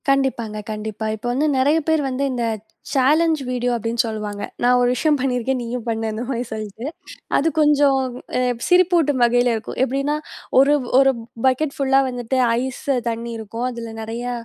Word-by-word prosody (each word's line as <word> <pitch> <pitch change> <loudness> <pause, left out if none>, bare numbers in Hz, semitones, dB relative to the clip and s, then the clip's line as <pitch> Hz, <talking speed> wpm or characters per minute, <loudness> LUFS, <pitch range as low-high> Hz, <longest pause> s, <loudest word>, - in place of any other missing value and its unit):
கண்டிப்பாங்க, 260 -6 0
கண்டிப்பா. 215 0 -5
இப்ப 220 +3 -12
வந்து 290 +5 +1
நெறைய 290 +5 +3
பேர் 320 -1 +3
வந்து 260 +2 -2
இந்த 240 -1 -2 0.5
சேலஞ் 305 +5 +4 0.2
வீடியோ 245 -1 0
அப்படின்னு 230 0 0
சொல்லுவாங்க. 210 -2 -4 0.2
நான் 250 +1 +5
ஒரு 245 - +3
விஷயம் 300 +3 +2
பண்ணியிருக்கேன். 255 0 0
நீயும் 235 0 -4
பண்ணு 225 0 -1
அந்த 215 +2 -4
மாரி 245 -2 -1
சொல்லிட்டு 215 +1 -6 0.5
அது 300 - +2
கொஞ்சம் 290 -2 +4 0.4
எ - - +2 0.3
சிரிப்பூட்டும் 345 -6 +3
வகையில 245 +1 +3
இருக்கும். 220 - -6
எப்படின்னா 275 +3 0 0.4
1 275 +2 +5 0.3
1 270 0 +5 0.3
பக்கெட் 275 +3 +1
ஃபுல்லா 270 -1 +3
வந்துட்டு 245 0 -2 0.2
ஐஸ் 260 0 -5 0.3
தண்ணி 230 +1 -4
இருக்கும். 225 +2 -5
அதில 235 -2 -6
நிறையா 235 +3 -4
250 Hz, 160 wpm, -21 LUFS, 230-275 Hz, 0.5 s, நான்